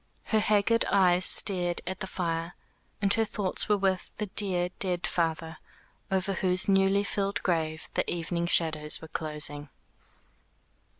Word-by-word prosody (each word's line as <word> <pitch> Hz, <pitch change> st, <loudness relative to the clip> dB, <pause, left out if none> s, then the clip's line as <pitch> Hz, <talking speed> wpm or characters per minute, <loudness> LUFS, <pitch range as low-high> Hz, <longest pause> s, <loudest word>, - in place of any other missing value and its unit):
Her 220 Hz, -, 0 dB
haggard 215 Hz, +2 st, +2 dB
eyes 185 Hz, -2 st, +4 dB
stared 175 Hz, -3 st, +3 dB
at 185 Hz, +1 st, -4 dB
the 190 Hz, -, -5 dB
fire, 165 Hz, -2 st, -4 dB, 0.5 s
and 200 Hz, 0 st, +5 dB
her 225 Hz, -, +2 dB
thoughts 205 Hz, -3 st, -2 dB
were 210 Hz, -, +3 dB
with 190 Hz, -2 st, -2 dB
the 210 Hz, -, -3 dB
dear 185 Hz, -3 st, 0 dB
dead 180 Hz, -2 st, +1 dB
father, 165 Hz, -1 st, -2 dB, 0.5 s
over 190 Hz, +1 st, -1 dB
whose 185 Hz, -1 st, +1 dB
newly 195 Hz, 0 st, +3 dB
filled 200 Hz, 0 st, -3 dB
grave 160 Hz, -3 st, -2 dB
the -, -, -1 dB
evening 170 Hz, 0 st, -3 dB
shadows 155 Hz, -3 st, +1 dB
were 160 Hz, -, -12 dB
closing. 150 Hz, -2 st, -2 dB
180 Hz, 140 wpm, -27 LUFS, 165-195 Hz, 0.5 s, and